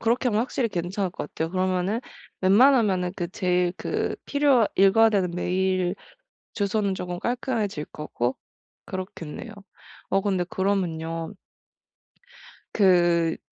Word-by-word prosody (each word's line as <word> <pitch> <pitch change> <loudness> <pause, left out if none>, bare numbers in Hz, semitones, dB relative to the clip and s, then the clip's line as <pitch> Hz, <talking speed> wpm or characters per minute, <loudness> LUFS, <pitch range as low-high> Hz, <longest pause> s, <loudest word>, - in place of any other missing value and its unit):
그렇게 240 +3 +1
하면 215 -2 +1
확실히 240 0 -1
괜찮을 180 +1 -2
것 160 - -6
같아요. 160 0 -3
그러면은 185 +3 0 0.4
웬만하면은 195 -3 +4
그 175 -2 -3
제일 180 -1 +1
그 - - -2
필요 285 -6 +3
읽어야 200 +4 +6
되는 190 -4 +1
메일 185 +1 0 0.6
주소는 200 -1 0
조금 180 -1 -4
깔끔해질 230 - -2
거고 130 -4 -3 0.5
그렇겠네요. 185 +2 -7 0.6
어 195 - +2
근데 190 -3 0
그러면요 170 -3 -2 1.4
그 175 -4 +3
190 Hz, 270 characters per minute, -25 LUFS, 175-210 Hz, 1.4 s, 읽어야